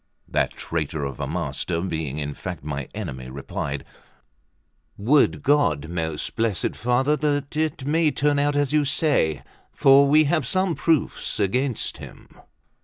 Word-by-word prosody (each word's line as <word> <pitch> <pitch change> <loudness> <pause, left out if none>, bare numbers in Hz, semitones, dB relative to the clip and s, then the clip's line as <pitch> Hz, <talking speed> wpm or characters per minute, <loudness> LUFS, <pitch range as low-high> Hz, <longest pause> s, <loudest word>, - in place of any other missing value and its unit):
That - - 0
traitor 80 -2 -3
of 70 -2 -6
a - - -2
master, 85 -2 -2
being 80 -5 -3
in 75 -1 -3
fact 90 0 -7
my 70 -2 -5
enemy, 65 -1 -6
replied: 70 +1 -5 1.1
"Would 135 +8 +3
God, 105 - +2
most 80 -3 -3
blessed 110 -5 0
Father, 125 +5 +1
that 145 -1 -1
it 155 -3 -1
may 160 +2 +2
turn 145 0 +1
out 145 0 +1
as 145 0 +1
you 150 -1 +4
say; 135 - +2 0.3
for 140 +1 +5
we 155 +2 +5
have 145 -3 +1
some 185 +1 +1
proofs 160 -7 0
against 125 +5 0
him." - - -12
125 Hz, 145 wpm, -23 LUFS, -, 1.1 s, for